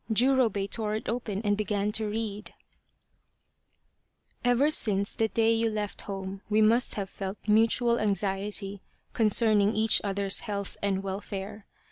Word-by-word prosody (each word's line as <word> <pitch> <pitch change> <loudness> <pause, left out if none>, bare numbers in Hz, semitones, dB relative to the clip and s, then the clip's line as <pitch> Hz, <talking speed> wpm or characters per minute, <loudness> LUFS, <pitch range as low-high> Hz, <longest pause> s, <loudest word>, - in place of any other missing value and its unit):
" - - -3
Jurobei 230 -4 +2
tore 215 0 -2
it 215 - -5
open 220 -3 -3
and 205 -1 +2
began 210 0 -1
to 215 0 -1
read: 210 -1 -5 0.9
" - - -43
Ever 245 +5 +3
since 200 -7 +3
the 225 - +1
day 225 +1 +2
you 225 0 +1
left 210 -1 -4
home 195 -1 -6
we 215 0 +2
must 225 +3 +3
have 200 -2 -3
felt 195 +1 -6
mutual 230 +2 +3
anxiety 200 0 -2 0.3
concerning 215 -1 +3
each 220 0 +3
other's 200 -1 0
health 200 -2 -5
and 195 -1 -1
welfare. 200 +1 -6
210 Hz, 145 wpm, -28 LUFS, 200-225 Hz, 0.9 s, Ever